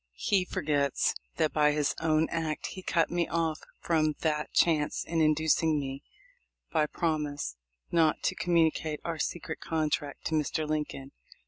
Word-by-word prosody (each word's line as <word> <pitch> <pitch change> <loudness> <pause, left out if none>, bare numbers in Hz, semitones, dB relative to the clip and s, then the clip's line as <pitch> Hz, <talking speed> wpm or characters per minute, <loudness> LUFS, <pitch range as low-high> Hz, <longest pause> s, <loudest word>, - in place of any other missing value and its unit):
He 190 -3 +2
forgets 145 -5 +1 0.2
that 155 - +1
by 150 -1 +4
his 150 -1 +1
own 160 0 +3
act 160 -2 -2
he 190 - -7
cut 170 -2 +1
me 175 -1 +1
off 165 -2 0 0.2
from 155 -2 +1
that 150 -2 0
chance 155 -3 +2
in 165 -1 0
inducing 155 0 +3
me, 135 0 -5 0.7
by 155 -2 +2
promise, 150 - -2 0.4
not 165 -2 +3
to - - +1
com 175 -1 -1
municate 160 -2 +2
our 165 -2 -3
secret 160 0 -3
contract 155 -3 -2
to - - -2
Mr. 155 0 0
Lincoln. 150 -3 -3
155 Hz, 150 wpm, -29 LUFS, 150-165 Hz, 0.7 s, by